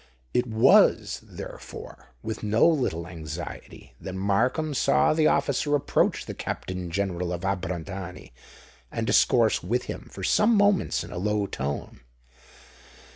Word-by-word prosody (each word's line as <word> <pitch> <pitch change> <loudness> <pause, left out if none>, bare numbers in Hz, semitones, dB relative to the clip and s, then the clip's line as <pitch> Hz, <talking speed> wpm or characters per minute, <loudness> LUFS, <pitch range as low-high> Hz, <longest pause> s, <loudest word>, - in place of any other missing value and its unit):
It 125 0 +1
was, 110 0 +4
therefore, - - -10 0.2
with 110 - -4
no 110 +7 +3
little 125 - 0
anxiety 80 -6 -8
that 95 -1 -6
Markham 120 +11 +1
saw 140 - +3
the 155 -1 +3
officer 145 +1 +1
approach 145 - +1
the - - -6
Captain 90 -2 -5
General 90 -1 -2
of 85 -1 -3
Abrantani, 95 -4 -4 0.6
and 115 - -2
discourse 115 -1 +3
with 120 +8 -1
him - - -7
for - - -8
some 225 +2 +4
moments 200 - +2
in 85 - -10
a - - -4
low 105 +1 0
tone. 70 -5 -5
100 Hz, 130 wpm, -26 LUFS, 90-125 Hz, 0.6 s, was